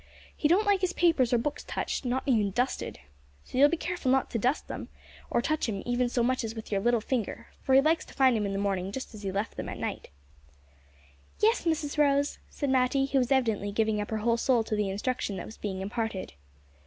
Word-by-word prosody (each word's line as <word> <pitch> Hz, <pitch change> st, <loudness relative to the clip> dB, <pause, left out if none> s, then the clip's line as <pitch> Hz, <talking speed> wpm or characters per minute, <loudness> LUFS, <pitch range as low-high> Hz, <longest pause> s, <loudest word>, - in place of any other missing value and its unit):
"He 295 Hz, -, +1 dB
don't 375 Hz, +7 st, +3 dB
like 405 Hz, -2 st, +3 dB
his 370 Hz, -1 st, 0 dB
papers 320 Hz, -9 st, +3 dB
or 245 Hz, -, +4 dB
books 290 Hz, +5 st, -2 dB
touched; -, -, -3 dB
not 250 Hz, +2 st, 0 dB
even 220 Hz, -7 st, +2 dB
dusted! 245 Hz, -, -2 dB, 0.4 s
So 255 Hz, -, -4 dB
you'll 285 Hz, +1 st, +8 dB
be 340 Hz, -, 0 dB
careful 350 Hz, -5 st, -2 dB
not 265 Hz, 0 st, +2 dB
to 230 Hz, -, -1 dB
dust 255 Hz, +7 st, +1 dB
'em, -, -, -6 dB, 0.4 s
nor 240 Hz, -, +2 dB
to -, -, -1 dB
touch 310 Hz, -6 st, 0 dB
'em 200 Hz, -3 st, -3 dB
even 245 Hz, 0 st, +1 dB
so 240 Hz, -1 st, +1 dB
much 255 Hz, +1 st, +1 dB
as 225 Hz, 0 st, -4 dB
with 220 Hz, -1 st, -8 dB
your 195 Hz, -1 st, +1 dB
little 240 Hz, +1 st, +2 dB
finger, 230 Hz, -2 st, -3 dB
for 265 Hz, -, +2 dB
he 270 Hz, -, +8 dB
likes 315 Hz, +3 st, +2 dB
to -, -, -14 dB
find 260 Hz, -3 st, +5 dB
'em 210 Hz, -2 st, 0 dB
in 195 Hz, -, -3 dB
the -, -, -1 dB
mornin' 195 Hz, -1 st, -1 dB
just 260 Hz, +2 st, -6 dB
as 215 Hz, -, -9 dB
he 195 Hz, -2 st, -3 dB
left 200 Hz, +3 st, -3 dB
'em -, -, -4 dB
at -, -, -6 dB
night." -, -, -4 dB, 1.3 s
"Yes, 445 Hz, 0 st, +3 dB
Mrs 310 Hz, -2 st, -1 dB
Rose," 285 Hz, -1 st, +2 dB
said 285 Hz, -3 st, -2 dB
Matty, 265 Hz, +1 st, +3 dB
who 275 Hz, 0 st, +1 dB
was 250 Hz, +1 st, 0 dB
evidently 225 Hz, -6 st, +1 dB
giving 215 Hz, 0 st, +1 dB
up 205 Hz, -, -5 dB
her 220 Hz, -, -1 dB
whole 235 Hz, 0 st, +3 dB
soul 240 Hz, -1 st, +2 dB
to 220 Hz, -, -2 dB
the 210 Hz, -2 st, 0 dB
instruction 205 Hz, 0 st, -2 dB
that 175 Hz, -, -5 dB
was 220 Hz, -, -11 dB
being 190 Hz, -2 st, -4 dB
imparted. 205 Hz, 0 st, -3 dB
245 Hz, 240 wpm, -28 LUFS, 215-275 Hz, 1.3 s, you'll